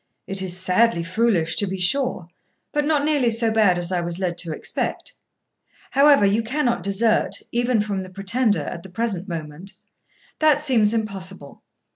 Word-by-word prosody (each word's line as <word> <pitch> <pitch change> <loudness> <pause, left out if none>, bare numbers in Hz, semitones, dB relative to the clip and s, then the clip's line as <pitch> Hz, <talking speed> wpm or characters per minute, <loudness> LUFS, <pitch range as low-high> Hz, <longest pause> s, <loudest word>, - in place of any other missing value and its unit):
It 195 0 -4
is 180 -1 -1
sadly 185 0 +2
foolish, 175 -3 0
to 205 - +1
be 190 +1 -4
sure, 255 +1 0 0.5
but 295 0 0
not 295 -2 +1
nearly 290 -5 +2
so 230 0 +1
bad 210 -5 +3
as 175 +1 -3
I 180 -1 0
was 170 0 -3
led 180 -2 -2
to 170 -2 -3
expect. 155 - -4 0.8
However, 280 -4 +5
you 205 +3 +2
cannot 240 -2 -1
desert, 210 +4 +1 0.2
even 240 -1 +1
from 205 -2 -3
the 185 - -8
Pretender, 205 +4 0
at 170 - -6
the 190 - -12
present 195 -1 -3
moment; 165 +3 -6 0.7
that 305 -2 +4
seems 245 -8 +3
impossible. 195 -8 -5
205 Hz, 165 wpm, -22 LUFS, 180-235 Hz, 0.8 s, However